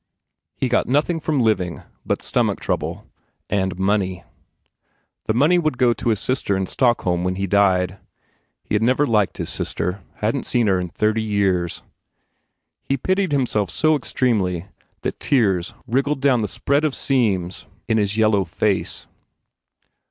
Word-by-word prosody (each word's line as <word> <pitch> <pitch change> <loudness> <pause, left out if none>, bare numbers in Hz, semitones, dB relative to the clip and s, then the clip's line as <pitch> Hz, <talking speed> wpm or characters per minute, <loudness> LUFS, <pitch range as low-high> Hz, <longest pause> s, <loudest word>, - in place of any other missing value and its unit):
He 130 - -1
got 125 - +1
nothing 150 +6 +1
from 150 -3 0
living 95 -7 0 0.2
but - - -2
stomach - - 0
trouble - - -3 0.5
and 95 -3 0
money. 95 -1 0 1.0
The 110 - 0
money 155 +8 +4
would 155 -6 -1
go 120 -1 +4
to 115 - -2
his 110 -3 +1
sister 115 -4 -1
in 95 - -1
Stockholm 95 -6 +1
when 90 0 -1
he 95 +1 -2
died. 95 -1 +2 0.6
He - - -6
had 105 - +2
never 130 +5 +3
liked 105 -6 +1
his - - -4
sister, 90 +2 -3
hadn 115 +5 -1
t - - -9
seen 120 -2 +2
her 95 -3 +2
in 90 - -2
thirty 110 +4 0
years. 100 -5 0 1.0
He 135 - -1
pitied 185 +5 0
himself 120 - +1
so 155 - +2
extremely 100 - 0 0.4
that - - -3
tears 95 -10 +1
wriggled 135 +5 0
down 130 -4 +3
the 105 - -1
spread 140 +7 0
of 150 -3 0
seams 100 -10 0 0.2
in 110 -2 +2
his 105 +1 0
yellow 110 -3 +3
face. 95 +3 -1
110 Hz, 155 wpm, -21 LUFS, 95-130 Hz, 1.0 s, money